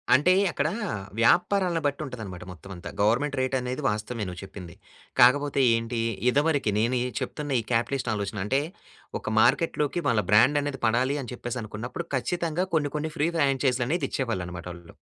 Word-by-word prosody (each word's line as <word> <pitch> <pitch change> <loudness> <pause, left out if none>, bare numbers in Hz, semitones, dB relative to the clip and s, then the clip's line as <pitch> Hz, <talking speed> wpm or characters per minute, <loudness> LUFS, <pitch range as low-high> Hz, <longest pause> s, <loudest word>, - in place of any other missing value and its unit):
అంటే 175 +7 +4 0.2
అక్కడా 150 +3 0 0.5
వ్యాపారాలను 175 - +3
బట్టి 145 +1 0
ఉంటదన్నమాట 105 -9 -7
మొత్తం 90 +2 -12
అంతా. 85 - -8
గవర్నమెంట్ 130 +8 +2
రేట్ 130 +1 0
అనేది 125 +3 -4
వాస్తవమే 105 +1 -3
నువ్వు 90 -1 -7
చెప్పింది. 95 -3 -10 0.4
కాకపోతే 140 +3 +5
ఏంటి? 115 +1 -2 0.3
ఇదివరకి 145 -4 +2
నేను 120 +4 +1
ఈ - - -1
చెప్తున్న 150 -2 -4
ఈ - - -12
క్యాపిటలిస్ట్ 120 +1 0
ఆలోచన. 100 0 -3
అంటే 135 +6 +2 0.6
ఒక - - -5
మార్కెట్‌లోకి 150 +5 +2
వాళ్ళ 110 -3 +3
బ్రాండ్ 120 +8 +5
అనేది 140 -2 -4
పడాలి 125 +5 +2
అని 125 - -8
చెప్పేసి 120 0 -5
అనుకున్నప్పుడు 120 +10 -6
ఖచ్చితంగా 170 +5 -1
కొన్ని, 145 -3 +1
కొన్ని 155 +1 -2
ఫ్రీ 150 +3 +2
ఫ్రాంచైజ్‌లనేది 135 +1 +1
ఇచ్చేవాళ్ళు 115 -9 -1
అన్నమాట 90 -1 -8
వాళ్ళు. 85 -1 -13
130 Hz, 160 wpm, -26 LUFS, 110-145 Hz, 0.6 s, కాకపోతే